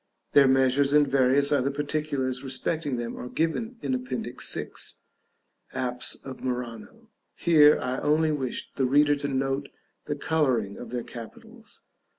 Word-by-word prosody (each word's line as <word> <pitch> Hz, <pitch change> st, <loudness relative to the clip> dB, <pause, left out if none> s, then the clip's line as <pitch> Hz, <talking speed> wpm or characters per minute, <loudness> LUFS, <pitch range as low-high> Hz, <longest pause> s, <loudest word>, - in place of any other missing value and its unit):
Their 140 Hz, -1 st, +6 dB
measures 135 Hz, +1 st, +3 dB
and 150 Hz, -1 st, +5 dB
various 135 Hz, +1 st, +3 dB
other 140 Hz, -2 st, +2 dB
particulars 140 Hz, -3 st, -2 dB
respecting 135 Hz, +1 st, -2 dB
them 120 Hz, 0 st, -4 dB
are 125 Hz, -, -6 dB
given 225 Hz, -, -1 dB
in 135 Hz, -, -1 dB
Appendix 125 Hz, 0 st, -3 dB
6. -, -, -5 dB, 0.8 s
"Apse 125 Hz, -1 st, -3 dB
of 135 Hz, -1 st, -9 dB
Murano;" 125 Hz, -, -5 dB, 0.3 s
here 150 Hz, -3 st, +6 dB
I 130 Hz, 0 st, -2 dB
only 155 Hz, +1 st, +2 dB
wish 135 Hz, -5 st, -3 dB
the 135 Hz, -, +1 dB
reader 145 Hz, +2 st, +4 dB
to 145 Hz, 0 st, -3 dB
note 135 Hz, +1 st, -1 dB, 0.4 s
the -, -, -2 dB
coloring 130 Hz, -11 st, 0 dB
of 125 Hz, -, -9 dB
their 120 Hz, -1 st, -3 dB
capitals. 115 Hz, -2 st, -12 dB
135 Hz, 145 wpm, -26 LUFS, 125-150 Hz, 0.8 s, Their